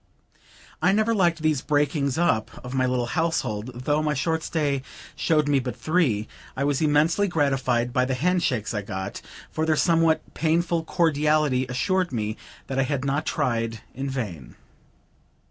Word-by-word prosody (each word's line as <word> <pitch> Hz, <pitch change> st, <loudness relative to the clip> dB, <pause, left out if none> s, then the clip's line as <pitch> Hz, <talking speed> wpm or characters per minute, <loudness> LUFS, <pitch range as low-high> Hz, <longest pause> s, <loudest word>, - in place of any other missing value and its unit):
I 180 Hz, +4 st, +4 dB
never 215 Hz, +2 st, +2 dB
liked 170 Hz, -6 st, +2 dB
these 155 Hz, -4 st, +2 dB
breakings 145 Hz, -2 st, 0 dB
up 115 Hz, -11 st, +2 dB, 0.2 s
of 125 Hz, -, -6 dB
my 130 Hz, -1 st, +2 dB
little 125 Hz, -1 st, 0 dB
household; 125 Hz, -6 st, -2 dB
though 145 Hz, +3 st, +1 dB
my 150 Hz, -1 st, 0 dB
short 160 Hz, +4 st, 0 dB
stay 145 Hz, -4 st, -1 dB, 0.3 s
showed 155 Hz, -3 st, +2 dB
me 145 Hz, -1 st, +3 dB
but 125 Hz, -1 st, -4 dB
three. 140 Hz, -, +1 dB, 0.3 s
I 135 Hz, -, 0 dB
was 145 Hz, 0 st, +1 dB
immensely 155 Hz, +6 st, +3 dB
gratified 135 Hz, -7 st, +1 dB
by 125 Hz, -, +2 dB
the 130 Hz, 0 st, -1 dB
hand 180 Hz, +7 st, +1 dB
shakes 120 Hz, -8 st, -1 dB
I 105 Hz, -, -1 dB
got, 100 Hz, +1 st, -5 dB, 0.3 s
for 160 Hz, -, -2 dB
their 160 Hz, -1 st, +2 dB
somewhat 165 Hz, -1 st, +3 dB
painful 165 Hz, +1 st, +1 dB
cordiality 150 Hz, -5 st, +2 dB
assured 180 Hz, +8 st, 0 dB
me 110 Hz, -3 st, -2 dB, 0.3 s
that 135 Hz, 0 st, -3 dB
I -, -, +4 dB
had 140 Hz, -2 st, -1 dB
not 140 Hz, +3 st, -1 dB
tried 115 Hz, -2 st, -1 dB
in 135 Hz, +2 st, -4 dB
vain. 100 Hz, -, -5 dB
145 Hz, 165 wpm, -25 LUFS, 125-160 Hz, 0.3 s, I